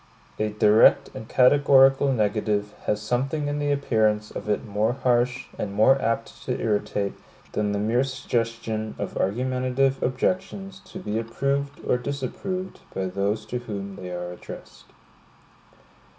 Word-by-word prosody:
A 110 0 +1
direct 105 +1 +5
and 110 - -8
categorical 135 +1 +5
negative 105 -2 0
has 105 - +1
something 135 +6 -1
in 145 0 -2
the 145 0 0
appearance 110 -6 +1
of - - -6
it 105 - 0
more 105 +2 0
harsh, 125 0 +1
and 100 -1 -3
more 135 +6 +5
apt 115 - -2
to - - -2
irritate, 105 -2 -1 0.4
than 105 -1 0
the 100 - -1
mere 115 +5 +2
suggestion 115 -4 -2
of 100 - -4
argumentative 130 +5 0
objections 190 +8 -1
to - - -10
be 110 - -2
approved 140 +5 -2
or 125 - +2
disapproved 145 +8 -4 0.2
by 95 - -1
those 100 +3 -1
to 125 - -3
whom 100 -4 -6
they 90 -2 -7
are 90 0 -5
addressed. 90 - -11
115 Hz, 140 wpm, -25 LUFS, 105-135 Hz, 0.4 s, direct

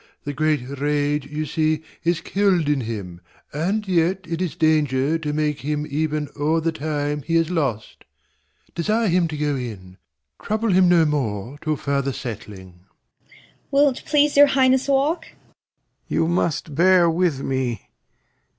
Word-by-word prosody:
The 145 - -4
great 150 -3 0
rage 145 -1 0
You 150 +2 -4
see 155 +1 0 0.2
is 170 0 +1
kill'd 190 -5 +1
in 145 -2 +1
him; 100 -7 -6 0.3
and 195 +8 -1
yet 185 +1 +1
it 165 +1 -3
is 180 -4 -2
danger 155 -1 +2
To 150 -2 -3
make 150 -1 -1
him 150 +1 -2
even 150 0 -1
o'er 155 +3 +1
the 165 +1 0
time 150 -1 -2
he 165 +4 -2
has 165 +1 +2
lost. 135 -11 -3 0.7
Desire 215 +5 0
him 175 -1 +2
to 155 -2 -6
go 145 -1 0
in. 100 -8 -7 0.4
Trouble 220 +1 -1
him 185 -1 +5
no 170 -2 +5
more 130 -3 -2
Till 155 -1 -1
further 140 -1 -1
settling. 100 -7 -8
Cor. 95 +2 -33 0.4
Will't 280 -2 +2
please 295 -1 +2
your 285 0 +8
Highness 265 -1 +3
walk? 290 +5 +1
Lear. - - -21 0.9
You 165 - +1
must 170 -3 -1
bear 175 +3 +5
with 165 -4 +1
me. 130 -5 -3
155 Hz, 155 wpm, -22 LUFS, 140-180 Hz, 0.9 s, your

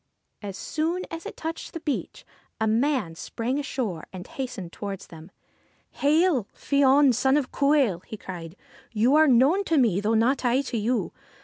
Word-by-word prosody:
As 200 -2 -6
soon 330 - -2
as 330 0 -6
it - - -9
touched 325 0 -5
the 330 - -5
beach, 300 -3 -4 0.3
a 220 - +1
man 225 - +1
sprang 230 - -3
ashore, 235 - -4
and 185 -1 -8
hastened 225 -10 -6
towards 200 -2 -6
them. 165 +1 -13 0.4
' - - -39
Hail! 300 - +3
Fion, 280 -1 +4
son 265 +4 +3
of 275 -4 -2
Cumhail! 280 - +2
' - - -28
he 220 - -7
cried. 175 -4 -8 0.2
' - - -25
You 250 +5 +5
are 310 0 +6
known 275 +10 +4
to 330 - +1
me, 220 -8 +3
though 220 +2 +1
not 245 +6 +2
I 250 +2 +2
to 260 -4 -4
you. 235 +3 -1
255 Hz, 185 wpm, -25 LUFS, 205-290 Hz, 0.4 s, are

